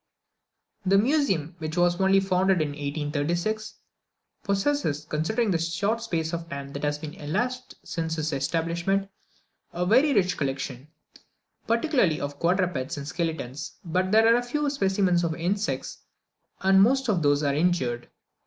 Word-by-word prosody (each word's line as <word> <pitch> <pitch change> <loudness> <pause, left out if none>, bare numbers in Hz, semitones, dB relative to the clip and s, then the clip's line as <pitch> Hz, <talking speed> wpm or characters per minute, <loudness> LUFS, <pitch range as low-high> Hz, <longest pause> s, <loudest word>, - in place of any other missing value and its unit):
The 195 +1 +4
Museum, 205 - +1
which 160 +1 -4
was 175 +1 +2
only 195 0 +5
founded 190 -1 +2
in 155 -2 0
1836, 150 +9 -2 0.7
possesses, 200 - 0
considering 205 +10 0
the 170 - +1
short 200 +8 -1
space 165 -7 -2
of 170 0 -4
time 140 -1 -6
that 140 0 -6
has 145 0 0
elapsed 210 +13 -3
since 160 -1 -3
its 155 0 -2
establishment, 170 +7 -1 0.6
a 175 +1 -2
very 255 +10 +4
rich 185 -3 +2
collection, 135 -1 -3 0.8
particularly 230 - +2
of 140 0 -5
quadrupeds 170 -5 0
and 140 0 -6
skeletons, 160 -5 -4
but 185 +3 0
there 220 +1 +6
are 230 +1 +5
very - - -2
few 295 +1 0
specimens 190 -7 +1
of 165 -1 -1
insects, 195 +5 -2 0.6
and 190 0 +5
most 265 +5 +3
of 195 -6 +1
those 145 0 +2
are 140 -1 +2
injured. 140 -7 0
175 Hz, 145 wpm, -26 LUFS, 150-200 Hz, 0.8 s, there